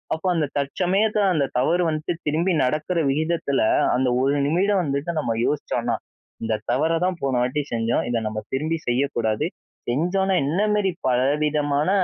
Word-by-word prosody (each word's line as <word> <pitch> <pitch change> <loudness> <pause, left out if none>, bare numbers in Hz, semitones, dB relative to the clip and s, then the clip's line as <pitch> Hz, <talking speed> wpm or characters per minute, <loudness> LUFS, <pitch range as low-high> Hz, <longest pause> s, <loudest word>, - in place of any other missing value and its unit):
அப்போ, 160 - -10
அந்த 155 -3 +1
தற்சமயத்தில 195 +8 +1
அந்த 140 -3 +1
தவறு 175 +7 +2
வந்துட்டு 155 +2 -2
திரும்பி 170 +4 +1
நடக்கிற 155 +6 0
விகிதத்தில, 155 -2 0 0.4
அந்த 130 -1 +1
ஒரு 140 +2 +2
நிமிடம் 190 +4 +2
வந்துட்டு 140 +3 -2
நம்ம 115 -6 -1
யோசிச்சோன்னா, 150 - -1 0.5
இந்த 110 -1 -1
தவற 155 +5 +1 0.2
தான் 180 -3 -3
போன 130 -2 +1
வாட்டி 135 +4 -1
செஞ்சோம், 115 +1 0
இத 120 - +1
நம்ம 110 0 -4
திரும்பி 155 +4 -1
செய்யக்கூடாது, 120 -4 0 0.4
செஞ்சோன்னா 185 +8 +1
என்ன 175 +7 0
மேரி 195 -3 +1 0.2
பலவிதமான 145 +4 +1
150 Hz, 145 wpm, -23 LUFS, 135-175 Hz, 0.5 s, தவறு